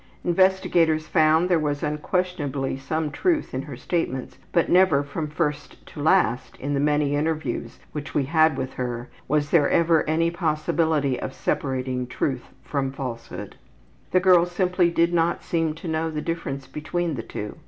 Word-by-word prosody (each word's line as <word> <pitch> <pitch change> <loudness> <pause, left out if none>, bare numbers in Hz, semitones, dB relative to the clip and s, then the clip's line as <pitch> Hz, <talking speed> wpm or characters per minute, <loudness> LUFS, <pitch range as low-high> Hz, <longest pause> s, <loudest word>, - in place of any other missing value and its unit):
Investigators 175 -3 +3
found 155 +2 +3
there 175 -3 +3
was 145 -2 -2
unquestionably 150 -3 -1
some 150 +3 -2
truth 340 - 0
in 130 - -1
her 140 -3 -8
statements, 130 -3 -3
but 170 - +2
never 175 -6 +4
from 150 +2 -4
first 150 -1 -3
to 150 - -9
last 145 -6 +2
in 145 +2 -3
the 140 - +1
many 145 0 +2
interviews 155 +1 -2
which 150 +1 -6
we 145 - +3
had 155 -1 +3
with 130 0 -3
her 120 -1 -4 0.2
was 145 0 0
there 165 -4 +4
ever 165 -1 +4
any 165 +2 +2
possibility 155 -4 0
of 130 - -5
separating 130 -2 -2
truth 125 0 -2 0.2
from 135 -2 -2
falsehood. 125 -4 -7 0.5
The 185 - +4
girl 180 -2 +5
simply 180 0 +1
did 170 0 +2
not 170 0 +1
seem 165 -2 0
to 165 - -8
know 160 0 -1
the 155 -1 -3
difference 150 -4 -4
between 165 +4 -3
the 125 - -3
two. 105 -2 -7
155 Hz, 165 wpm, -24 LUFS, 140-170 Hz, 0.5 s, girl